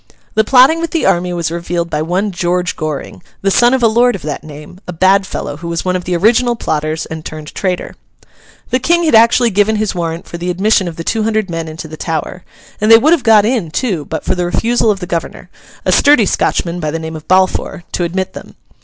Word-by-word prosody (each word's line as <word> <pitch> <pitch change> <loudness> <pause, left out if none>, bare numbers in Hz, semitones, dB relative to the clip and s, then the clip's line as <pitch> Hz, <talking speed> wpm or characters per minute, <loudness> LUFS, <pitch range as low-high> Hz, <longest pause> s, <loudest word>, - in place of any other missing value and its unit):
The 220 - +3
plotting 265 +8 +5
with 335 - -2
the 330 - -1
army 180 +1 +1
was 170 -2 -2
revealed 170 0 -3
by 150 - -1
one 185 +6 -1
George 180 0 -1
Goring, 150 - -5 0.2
the 195 - +2
son 240 +4 +4
of 260 -2 +1
a - - +6
lord 240 +2 +3
of 190 - -8
that 150 -1 -5
name: 150 +3 -11
a 180 - -5
bad 190 +3 +3
fellow 145 - -5
who 170 +2 -8
was 170 +1 -3
one 185 0 0
of 180 - -3
the 180 - -1
original 235 +6 +2
plotters, 155 -6 -2
and 160 -1 -7
turned 155 -1 -8
traitor. 185 -2 -3 0.8
The 255 - +2
King 345 +6 +2
had 315 - +1
actually 230 +1 +5
given 205 +2 +2
his 215 -1 -1
warrant 170 -1 -4
for 170 - -8
the 175 +1 -3
admission 190 +1 +1
of 170 - -6
the 165 - -6
two 220 +6 -1
hundred 215 -3 -1
men 165 -1 -4
into 160 +1 -8
the 155 0 -10
Tower, 165 +2 -4 0.4
and 215 - +2
they 225 - +10
would 305 +8 +4
have 335 - +2
got 220 -3 +5
in 220 -8 0
too, 180 - -2
but 160 - -5
for - - +1
the 180 -1 -2
refusal 230 +5 +1
of 200 -2 0
the - - -3
governor—a 170 -1 -5
sturdy 285 -7 +5
Scotchman 175 -2 -1
of 155 0 -2
the - - -1
name 160 0 -6
of 155 - -10
Balfour—to 185 -1 0
admit 185 +2 -3
them. - - -11
180 Hz, 235 wpm, -15 LUFS, 165-220 Hz, 0.8 s, they